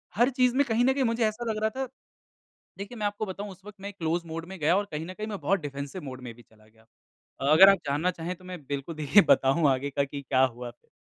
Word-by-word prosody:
हर 240 +4 +4
चीज़ 250 -1 +2
में 285 - +4
कहीं 235 +1 +2
न 265 - +4
कहीं 270 -1 0
मुझे 230 0 +1
ऐसा 225 +3 -4
लग 215 - -4
रहा 220 - +3
था 265 -1 -2 0.9
देखिए 205 +5 -7
मैं 210 - -1
आपको 205 +1 -3
बताऊँ 200 +2 -6
उस 190 +1 -14
वक़्त 210 -1 -12
मैं 200 +1 -6
क्लोज़ 170 -2 -2
मोड 165 +1 -5
में 190 -1 -8
गया 165 +5 +3
और 205 - +1
कहीं 155 +2 -4
न 185 - -8
कहीं 215 +2 -5
मैं 205 -3 -5
बहुत 195 -2 +1
डिफेंसिव 140 +4 -6
मोड 130 -2 -8
में 120 -2 -8
भी 120 - -17
चला 110 0 -24
गया 110 0 -25
था। 135 +5 -5
अगर 190 +5 +9
आप 195 - +3
जानना 150 +6 +1
चाहें 170 +1 -5
तो 185 - -19
मैं 180 -1 -7
बिल्कुल 140 +3 -4
देखिए 155 +7 +5
बताऊँ 140 +3 +4
आगे 135 +2 -1
का 140 +1 0
कि 140 0 -7
क्या 130 -1 +3
हुआ 120 -1 -4
फिर? 120 - -26
175 Hz, 270 wpm, -27 LUFS, 140-205 Hz, 0.9 s, अगर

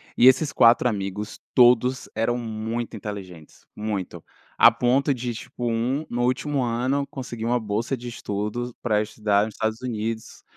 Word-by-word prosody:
e 125 - +6
esses 130 +3 +4
4 115 +1 +5
amigos, 105 -1 -4 0.2
todos 125 +1 +4
eram 115 +2 0
muito 115 0 -4
inteligentes, 95 -7 -9
muito, 105 -4 -4 0.3
a 115 - +8
ponto 125 +4 +2
de 125 -2 -2
tipo 120 +1 -6
um, 130 +7 -1
no 120 0 -3
último 135 +3 0
ano, 130 +4 0
conseguir 120 -4 -6
uma 120 +1 +2
bolsa 110 +5 -2
de 120 +1 -8
estudos 110 +2 -4
pra 105 -3 +1
estudar 105 -1 +1
nos 110 - -8
Estados 110 +2 -2
Unidos, 115 -2 -4
115 Hz, 155 wpm, -24 LUFS, 105-125 Hz, 0.3 s, a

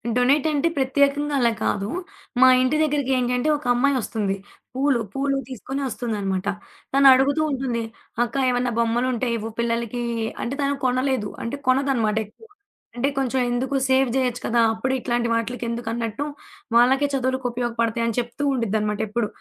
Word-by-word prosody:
Donate 265 +5 +3
అంటే 300 +3 +1
ప్రత్యేకంగా 280 +2 +2
అలా 235 -2 +3
కాదు. 200 0 -1 0.5
మా 260 - +9
ఇంటి 255 +4 +2
దగ్గరికి 285 -3 0
ఏంటి 250 0 0
అంటే 300 +5 0
ఒక 285 - -14
అమ్మాయొస్తుంది. 240 -6 0 0.4
పూలు, 270 -2 +2
పూలు 275 0 0
తీసుకొని 265 +3 -5
వస్తుందనమాట. 200 -6 -3 0.5
తను 275 0 +6
అడుగుతూ 275 +4 +2
ఉంటుంది. 255 -4 -2 0.4
"అక్క 235 - -5
ఏమన్నా 245 0 0
బొమ్మలు 235 +2 +1
ఉంటే 245 +1 -1
ఇవ్వు 220 +1 -5
పిల్లలకి" 235 0 -1 0.4
అంటే 265 +4 -3
తను 280 0 +1
కొనలేదు. 255 -4 0
అంటే 230 +5 -3
కొనదనమాట 255 -5 +2
ఎక్కువ. 330 - -19 0.5
అంటే 255 +3 +1
కొంచెం 265 -1 0
ఎందుకు 260 +3 -1
సేవ్ 265 0 +3
జేయొచ్చు 250 -2 0
కదా! 235 0 +1
అప్పుడే 255 +4 -1
ఇట్లాంటి 240 -1 -1
వాటిలకి 230 +2 -2
ఎందుకన్నట్టు, 230 +1 -3 0.5
"వాళ్ళకే 260 +4 +5
చదువులకు 260 -1 -1
ఉపయోగపడతాయి" 235 -1 -1
అని 230 - -1
చెప్తూ 240 +4 -4
ఉండిద్దనమాట 215 -3 -1
ఎప్పుడు. 210 +1 -1
250 Hz, 150 wpm, -23 LUFS, 230-270 Hz, 0.5 s, మా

